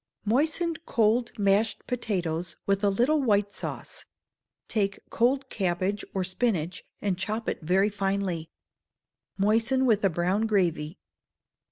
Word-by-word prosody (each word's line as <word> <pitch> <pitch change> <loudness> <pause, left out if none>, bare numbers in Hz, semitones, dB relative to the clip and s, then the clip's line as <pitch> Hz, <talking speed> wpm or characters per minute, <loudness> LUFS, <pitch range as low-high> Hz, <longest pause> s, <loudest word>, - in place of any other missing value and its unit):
Moisten 310 +9 +1
cold 230 0 +2
mashed 205 +2 +2
potatoes 180 -8 -2
with 200 +1 +1
a 205 - +5
little 250 +10 +2
white 205 -5 +2
sauce: - - -6 0.6
take 200 -3 0
cold 265 +3 +2
cabbage 190 +1 -1
or 190 - +1
spinach, 185 -3 -1 0.2
and 190 -3 0
chop 215 +4 -2
it - - -2
very 185 +5 +3
finely. 195 -5 -2 0.9
Moisten 225 +6 +2
with 215 -4 +3
a 195 - +5
brown 185 +6 0
gravy. 175 -5 0
200 Hz, 125 wpm, -27 LUFS, 185-230 Hz, 0.9 s, a